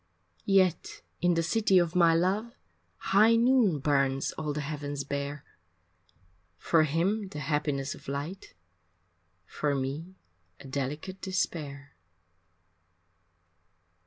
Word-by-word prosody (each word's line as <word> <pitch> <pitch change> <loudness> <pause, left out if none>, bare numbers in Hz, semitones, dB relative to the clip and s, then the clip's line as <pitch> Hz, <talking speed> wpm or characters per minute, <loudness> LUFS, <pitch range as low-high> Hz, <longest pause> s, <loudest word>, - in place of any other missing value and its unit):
Yet 190 -3 +2 0.2
in 175 -1 +3
the 165 - +1
city 200 +1 +2
of 175 -3 +2
my 170 -2 +5
love 200 +7 0 0.6
High 215 +4 +6
noon 235 - +4
burns 140 -1 +1
all 155 -1 -4
the 150 +1 -3
heavens 145 -1 -4
bare 140 +1 -4 1.1
For 160 - +3
him 190 +8 0
the 190 - -9
happiness 145 -1 -1
of - - -15
light, 145 - -6 0.9
For 145 +7 -2
me 145 +7 -4 0.4
a - - -13
delicate 145 +8 -4
despair. 150 -7 -3
155 Hz, 105 wpm, -29 LUFS, 140-190 Hz, 1.1 s, High